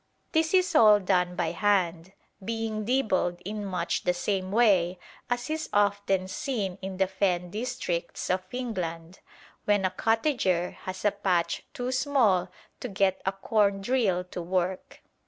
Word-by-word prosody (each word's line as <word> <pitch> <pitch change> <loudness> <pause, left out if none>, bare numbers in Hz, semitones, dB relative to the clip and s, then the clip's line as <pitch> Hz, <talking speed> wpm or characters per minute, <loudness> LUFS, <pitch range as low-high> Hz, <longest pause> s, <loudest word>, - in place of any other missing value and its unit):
This 320 +2 +2
is 365 -1 +3
all 215 -8 +7
done 180 -2 +1
by - - -1
hand, 185 -4 0 0.3
being 225 0 -3
dibbled 210 -8 +1
in 210 +1 -4
much 180 -3 -2
the 180 - +1
same 190 0 -2
way 195 -6 +3 0.3
as 245 0 -1
is 315 0 -3
often 200 -2 +1
seen 195 -2 -3
in 190 0 -5
the 190 - +3
Fen 185 -2 -1
districts 180 -6 -3
of 185 0 +1
England, 180 -9 -4 0.5
when 205 -2 +2
a 185 - +1
cottager 225 - +1
has 185 +2 -5
a 205 - +5
patch 185 -4 0
too 245 +1 -3
small 245 -10 +2 0.3
to - - -4
get 195 -3 +1
a - - +4
corndrill 200 0 +1
to 180 - -4
work. 180 +1 -2
195 Hz, 145 wpm, -27 LUFS, 180-225 Hz, 0.5 s, all